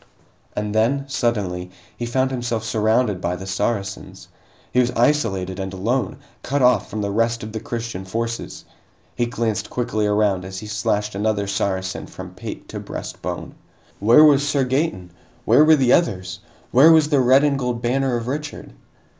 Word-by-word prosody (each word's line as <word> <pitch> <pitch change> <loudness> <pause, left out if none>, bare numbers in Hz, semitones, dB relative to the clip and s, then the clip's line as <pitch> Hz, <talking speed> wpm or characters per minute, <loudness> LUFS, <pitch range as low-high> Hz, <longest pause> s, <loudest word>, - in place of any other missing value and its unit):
And 105 0 -2
then, 125 +6 +1
suddenly, 100 -9 -1 0.3
he 120 - -4
found 130 +2 0
himself 120 -3 -2
surrounded 110 -2 +1
by 85 +1 -1
the 95 +2 -8
Saracens! 100 0 -3 0.4
He 125 - +3
was 125 -1 +3
isolated 100 -9 +1
and 95 0 -4
alone, 105 +4 -1 0.2
cut 140 0 -1
off 125 -5 +3
from 110 - -4
the 100 - -2
rest 115 +2 0
of 110 - -6
the 110 - -4
Christian 115 -4 -5
forces! 115 +4 -4 0.5
He 120 - 0
glanced 115 -2 -2
quickly 120 -4 -1
around 105 -3 +1
as 95 +1 -7
he 105 - -7
slashed 105 0 -1
another 100 0 0
Saracen 95 -1 -2
from - - -10
pate - - -8
to - - -5
breastbone. - - -6 0.5
Where 115 +9 +7
was 145 -2 +6
Sir 140 -3 +1
Gaeton? 125 - -1 0.3
Where 150 - +6
were 155 0 +7
the 130 -4 +3
others? 95 - 0 0.3
Where 145 +6 +7
was 155 -2 +5
the 145 -3 +3
red 130 +2 +5
and 140 -2 +2
gold 125 -2 -2
banner 130 +1 +1
of 115 - -5
Richard? 145 - -5
115 Hz, 170 wpm, -21 LUFS, 100-130 Hz, 0.5 s, Where